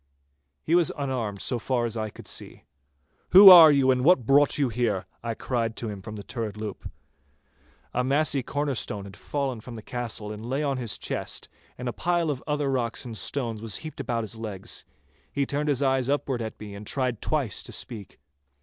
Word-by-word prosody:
He 160 - -1
was 175 -2 +5
unarmed 125 -8 -3
so 125 - -1
far 120 0 0
as 115 -1 -3
I 110 -1 -2
could - - -13
see. - - -6 0.7
'Who 195 +1 +12
are 165 -4 +11
you, 135 -2 +4
and 125 -1 +1
what 155 -6 +5
brought 140 +2 +4
you 140 -4 +1
there?' 110 -5 0 0.2
I 115 -1 -3
cried 115 -3 -2
to 115 - -4
him 100 -2 -7
from 105 +1 -8
the 100 - -7
turret 110 -3 -5
loop. 105 -2 -6 1.0
A 125 - +1
massy 140 +1 +2
corner 145 +2 -2
stone 100 -4 -4
fallen 135 +3 -3
from 120 +1 -9
the 110 - -9
castle 115 -3 -4
lay 120 +7 -3
on 140 -2 0
his 120 -5 -2
chest, - - -4 0.3
and 125 - -5
a 120 - -2
pile 175 -2 0
of 135 -2 -5
other 145 -2 0
rocks 125 -1 -1
and 115 -2 -6
stones 115 -2 -3
was 110 -3 -2
heaped 155 - -8
about 120 -4 -2
his 110 +1 -5
legs. 110 -4 -5 0.5
He 140 - 0
turned 145 +2 -1
his 140 -1 +2
eyes 135 -1 +1
upward 140 -3 0
at 110 -1 -6
me 105 -1 -8
and 100 +1 -9
tried 130 -5 -1
twice 140 -9 -1
to - - -9
speak. 105 -5 -7
125 Hz, 200 wpm, -26 LUFS, 110-140 Hz, 1.0 s, Who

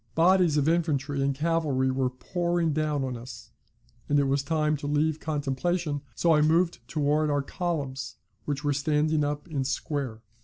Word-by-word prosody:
Bodies 175 -2 +4
of 145 0 +2
infantry 145 -4 +1
and 140 0 +1
cavalry 150 -4 +1
were 130 -1 0
pouring 170 +4 -1
down 150 -2 0
on 130 -2 -3
us, 120 0 -10 0.6
and 145 - +3
it - - +3
was 135 +1 +1
time 150 +1 +1
to 145 - -6
leave 150 +1 +1
contemplation, 150 +1 -1
so 170 -1 +3
I 150 - +4
moved 165 +3 +2
towards 150 0 +1
our 145 -1 +1
columns, 140 -6 -3 0.3
which 145 -1 -3
were 145 -1 +1
standing 150 +1 +1
up 145 +2 -3
in 145 -5 -2
square. 135 -4 -3
150 Hz, 165 wpm, -27 LUFS, 140-160 Hz, 0.6 s, Bodies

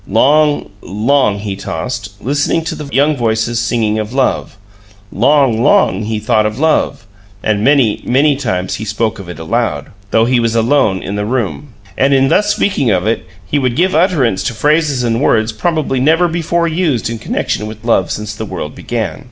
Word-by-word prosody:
Long, 145 +7 +2
long 110 +2 +1
he 100 -1 -4
tossed, 100 +3 -5
listening 145 +7 0
to 160 - -3
the 150 - -7
young 145 +3 +2
voices 115 -1 0
singing 110 -2 0
of 110 +2 -4
love; 130 -4 -1 0.5
long, 130 0 +2
long 105 -3 +3
he 110 0 -2
thought 110 0 +1
of 105 +1 -5
love, 155 -5 0 0.4
and 105 -1 0
many, 135 -5 +3
many 140 +4 +2
times 95 -9 -2
he - - -3
spoke 110 +1 -2
of 95 -3 -9
it 90 - -7
aloud, 115 +9 -2 0.2
though 115 +2 +3
he 125 0 +2
was 115 -1 0
alone 115 -4 +2
in 100 +1 -4
the 105 - -2
room. 125 +2 -3 0.2
And 135 +1 +3
in 135 0 +3
thus 210 0 +2
speaking 140 - 0
of 95 -2 +1
it, 110 -4 -1 0.2
he 145 - 0
would 130 -3 0
give 185 +5 +2
utterance 150 - +2
to 120 - -2
phrases 150 0 +1
and 115 +1 0
words 110 -5 +2
probably 155 +2 -1
never 160 +6 +3
before 170 0 -1
used 160 -7 0
in 115 0 -4
connection 105 0 -2
with 110 +1 -10
love 95 -6 +2
since 105 0 -4
the 110 - -6
world 85 -6 -5
began. 115 -1 -4
120 Hz, 185 wpm, -15 LUFS, 105-145 Hz, 0.5 s, long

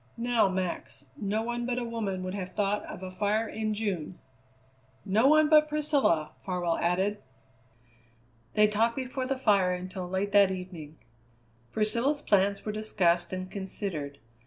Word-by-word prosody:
Now, 235 -3 +2
Max, 185 -2 -4
no 210 +2 -1
one 240 +1 -3
but 250 -1 -1
a 250 - -1
woman 210 -5 -3
would 185 0 -4
have 185 -2 -5
thought 205 0 0
of - - -8
a 185 - -6
fire 210 +4 0
in 215 -1 -2
June." 185 -5 -3 0.9
"No 215 +7 +3
one 310 +1 +6
but 305 0 +5
Priscilla!" 285 - +2
Farwell 175 -3 -1
added. 190 +4 0 1.3
They 210 - +6
talked 220 +2 +1
before 260 0 -3
the 270 0 -1
fire 200 -7 +3
until 180 0 -5
late 190 +2 -1
that 200 -2 +6
evening. 180 -5 -7 0.7
Priscilla's 235 +7 0
plans 200 0 +2
were 215 - -1
discussed 180 -5 +1
and 185 0 -5
considered. 185 -7 -4
205 Hz, 150 wpm, -29 LUFS, 185-230 Hz, 1.3 s, one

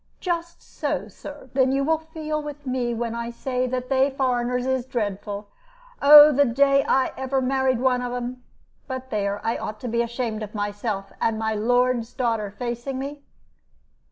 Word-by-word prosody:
"Just 340 -1 -3
so, - - -3
Sir. 285 -3 -11
Then 260 -1 +3
you 275 +1 +1
will 320 +2 +2
feel 315 -1 -4
with 295 -1 -8
me 255 -2 -1
when 230 0 -2
I 235 0 -4
say 255 +1 -2
that 250 0 -3
they 265 +1 +3
foreigners 250 -2 0
is 260 -1 0
dreadful. 205 -4 -4 0.5
Oh, 295 +1 +10
the 285 0 +4
day 275 +2 +3
that - - -6
I 265 -1 +2
ever 265 0 0
married 260 -1 +1
one 250 -1 +2
of 245 -1 -3
'em 245 +1 -5 0.4
but 260 -1 -6
there, 200 -1 -1
I 230 - 0
ought 215 0 -6
to 250 - -4
be 235 0 +1
ashamed 235 -2 -3
of 215 0 -7
myself, 205 -1 -3
and 225 -1 +1
my 220 0 -1
lord's 245 +2 +1
daughter 225 -5 -1
facing 240 +4 -4
me." 280 +2 -5
250 Hz, 180 wpm, -24 LUFS, 230-270 Hz, 0.5 s, Oh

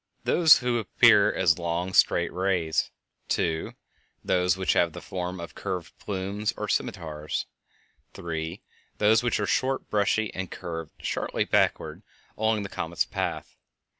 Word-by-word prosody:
_ - - -15
(1) - - +3
Those 165 -5 +7
which 120 -1 +1
appear - - +6
as 90 -3 +2
long, 85 +2 -2
straight 85 -1 +3
rays; 90 -3 0 0.4
(2) 80 -1 -1 0.5
Those 90 0 +2
which 95 - +1
have 85 -2 +2
the - - -7
form 90 0 -5
of 85 - -8
curved 90 -3 -5
plumes 100 +3 -3
or 105 - -3
scimitars; 75 -6 -2 0.7
(3) 80 +1 -5 0.3
Those 110 +1 +4
which 120 -2 0
are 105 - 0
short, 130 +6 -1
brushy, 105 +1 +1
and 95 -1 -4
curved 80 -2 -6
sharply - - -1
backward - - +1 0.3
along 110 -1 0
the 100 - -6
comet's 85 -2 -2
path. - - -4
95 Hz, 145 wpm, -26 LUFS, 85-105 Hz, 0.7 s, Those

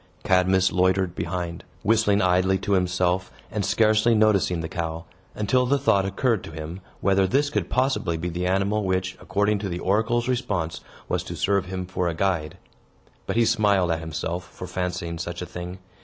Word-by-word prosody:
Cadmus 95 0 +3
loitered 95 0 +2
behind, 85 -1 -4 0.2
whistling 105 -1 +3
idly 95 +1 +3
to 100 - -4
himself, 90 -1 +1 0.2
and 105 -1 -1
scarcely 110 +2 +3
noticing 100 -5 +3
the 80 - -3
cow; 80 -1 -4 0.3
until 125 +5 +2
the 140 +2 +3
thought 100 -8 +2
occurred 110 +1 0
to - - -8
him, 80 +4 -7 0.2
whether 95 -1 +3
this 145 +8 +1
could - - -1
possibly 110 -10 +1
be 85 +2 -3
the 90 +1 -2
animal 100 +3 +1
which, 95 0 -1
according 105 +1 +1
to 100 -1 -3
the 85 - -3
oracle's 110 +6 +1
response, 105 -10 -1 0.3
was - - 0
to - - -7
serve 100 +1 +1
him 95 0 -4
for 90 -1 -2
a 85 - -1
guide. 85 -4 -1 0.7
But - - -2
he 115 0 +4
smiled 105 -6 +3
at 80 - 0
himself 85 +2 -4
for - - -8
fancying 90 -2 -3
such 85 +1 -5
a 90 - -4
thing. 90 +1 -7
95 Hz, 180 wpm, -24 LUFS, 90-105 Hz, 0.7 s, he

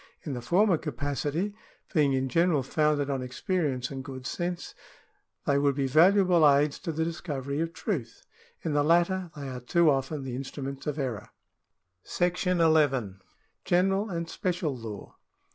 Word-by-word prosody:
In 145 - -4
the 125 - -4
former 175 - +3
capacity, 145 - -2 0.4
being 145 -5 +3
in 130 0 0
general 165 +1 +2
founded 150 +1 +1
on 135 -1 -1
experience 130 0 -2
and 135 -1 -5
good 130 -1 -8
sense, 175 +3 -3 0.7
they 140 0 +3
would 140 -1 +2
be 140 -1 0
valuable 175 +2 +5
aids 140 +1 +2
to 175 - -4
the 160 +1 -1
discovery 145 -4 -4
of 165 0 -1
truth; 155 - -4 0.4
in 160 - -1
the 145 - +3
latter, 175 +3 +2
they 140 -2 -6
are 130 -1 -5
too 160 +6 +3
often 135 +1 -2
the 130 -2 -5
instruments 135 +1 -6
of 150 0 -2
error. 125 -8 -3 0.7
28 - - -50
CIVIL - - -3 0.5
LAW 160 - +5
[§11 150 -2 +4
§ 130 -3 -1
II. 95 - -23 0.4
General 195 +4 +2
and 170 -2 -3
Special 175 -5 -2
Law. 110 -4 -9
145 Hz, 170 wpm, -28 LUFS, 135-170 Hz, 0.7 s, valuable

